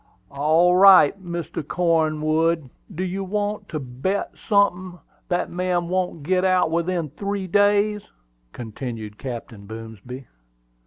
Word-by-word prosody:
"All 160 +5 +3
right, 190 -1 +7
Mr. 170 -2 -5
Cornwood. 160 -2 0 0.2
Do 180 - -2
you 190 +1 -3
want 205 +1 -3
to 155 - -3
bet 135 +10 -3
sunthin' 185 -3 0 0.3
that 180 -1 -1
man 175 -1 -1
won't 180 -4 -2
git 185 +4 +1
out 185 -3 +2
within 170 -2 -1
three 200 +3 -4
days?" 205 +2 +2 0.5
continued 110 - -7
Captain 115 -5 -7
Boomsby. 115 +4 -9
175 Hz, 115 wpm, -23 LUFS, 140-185 Hz, 0.5 s, right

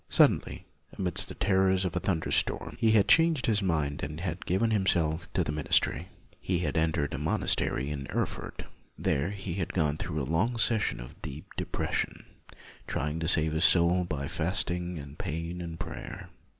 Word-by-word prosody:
Suddenly, - - +3 0.3
amidst 90 -3 0
the - - -7
terrors 95 -1 +2
of 90 - -2
a - - +2
thunderstorm, 80 -5 0
he 110 -2 +4
had 105 -3 +5
changed 165 -4 +5
his 105 -2 +2
mind 75 -6 0
and 75 +2 -4
had 90 0 -4
given 100 +6 +2
himself 85 -5 +1
to - - +2
the - - -2
ministry. 75 -1 +2 0.3
He 90 - 0
had 75 -4 -1
entered 80 -2 +1
a - - -3
monastery 70 +3 +1
in 70 -2 -4
Erfurt. - - -3 0.3
There 70 +6 0
he 95 -3 -5
had 90 -2 -3
gone 75 -4 +1
through 75 -3 -3
long 95 - 0
seasons 110 - +1
of - - -11
deep 70 +3 -8
de - - -3
pression, - - -2 0.6
trying 75 +3 -2
to 80 - -2
save 80 -2 +3
his 80 +1 +1
soul 90 +1 +5
by 70 -5 -3
fasting 90 +1 -2
and 70 +1 -9
pain 85 +1 -4
and 85 -1 -6
prayer. - - -7
85 Hz, 175 wpm, -29 LUFS, 75-95 Hz, 0.6 s, had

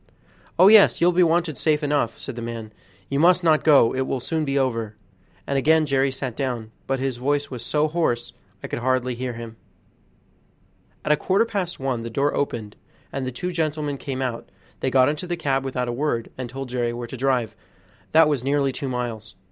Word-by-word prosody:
"Oh, 185 - +7
yes, 215 -1 +7
you'll 175 +1 +4
be 180 +1 +3
wanted 165 -3 +2
safe 155 -1 +1
enough," 145 -5 0
said 135 - -7
the 120 - -6
man; 115 -2 -6 0.3
"you 140 - -1
must 175 +2 +5
not 155 -2 +3
go, 140 -7 +5
it 130 0 -1
will 135 - -1
soon 160 +5 -2
be 140 0 -1
over," 115 -5 -1 0.5
and 140 0 0
again 160 +3 +4
Jerry 135 -1 +2
sat 130 -3 -5
down, 120 -5 -3 0.2
but 135 - 0
his 130 -2 -2
voice 145 +3 -1
was 125 -2 -6
so 150 +5 +1
hoarse 150 -8 -1 0.3
I - - -4
could - - -4
hardly 130 0 0
hear 125 +1 -4
him. 115 -1 -9 1.5
At - - +2
a - - +6
quarter 195 +4 +2
past 190 -6 -3
one 130 -3 -2
the 115 - -5
door 140 +5 0
opened, 110 -7 -3 0.4
and 135 -1 -3
the - - -3
two 180 +9 -4
gentlemen 155 -4 -2
came 135 -1 -4
out; 120 -3 -4 0.3
they 130 - 0
got 130 0 +4
into 150 +4 -2
the 175 0 -2
cab 135 -4 0
without 125 -2 -2
a 120 - -2
word, 120 -3 -2
and 130 -2 -6
told 135 0 -6
Jerry 120 -1 -1
where 120 0 -5
to 120 - -8
drive, 125 -4 0 0.6
that 160 0 +6
was 145 -5 0
nearly 140 0 +1
two 135 +1 -4
miles. 120 -3 -4
135 Hz, 210 wpm, -23 LUFS, 120-150 Hz, 1.5 s, Oh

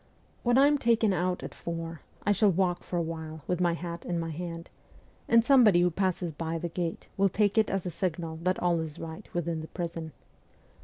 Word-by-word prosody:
When 245 +1 +3
I 275 - +7
am 290 0 +3
taken 225 -4 +3
out 180 0 -1
at - - -6
four, 165 -1 -5 0.2
I 205 - +4
shall 205 0 +4
walk 180 0 +1
for 175 - -4
a 170 - +1
while 160 -2 -6
with 180 0 -1
my 175 -1 +3
hat 170 0 -6
in 175 - -2
my 165 -1 -3
hand, 170 +1 -6 0.6
and 230 0 +5
somebody 235 -10 +6
who 175 0 +3
passes 180 -1 -1
by 165 +2 -3
the 170 +1 -3
gate 170 0 -3
will 195 0 +4
take 205 +2 +2
it 220 -1 +4
as 195 -1 -1
a 180 - -2
signal 165 -2 -3
that 185 +1 +1
all 175 -1 +1
is 160 -2 -5
right 165 +5 -8
within 170 -2 -2
the 160 - -7
prison. 165 -2 -5
175 Hz, 215 wpm, -29 LUFS, 165-195 Hz, 0.6 s, I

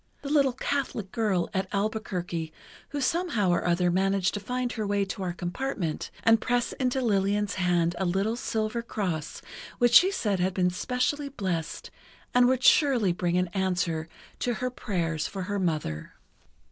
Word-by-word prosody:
the 280 - -4
little 275 -4 +4
Catholic 255 -7 -2
girl 205 -6 +1
at 190 -1 -1
Albuquerque 195 -6 -2 0.4
who 290 - -3
somehow 275 - +1
or 175 - +1
other 175 0 +2
managed 190 0 +1
to 205 - -2
find 250 +4 -2
her 215 -4 -3
way 200 0 +1
to 195 - -6
our 180 -2 -1
compartment 175 - -3
and 225 -1 +5
press 245 -1 0
into 260 0 +1
Lillian's 205 -2 +1
hand 175 -2 +1
a - - +1
little 195 +5 0
silver 225 -1 -2
cross 180 -10 -4 0.3
which 240 -1 +3
she 370 - +8
said 205 - 0
had 185 +1 0
been 180 -1 +2
specially 250 +8 -1
blessed 185 - -4 0.4
and 245 0 +6
would 260 0 +1
surely 245 - +5
bring 175 0 0
an 180 -1 +1
answer 175 -4 -1 0.3
to 245 -1 0
her 255 +2 -2
prayers 170 -10 -2
for 195 -2 -5
her 205 +2 -2
mother. 155 - -2
200 Hz, 165 wpm, -27 LUFS, 180-245 Hz, 0.4 s, she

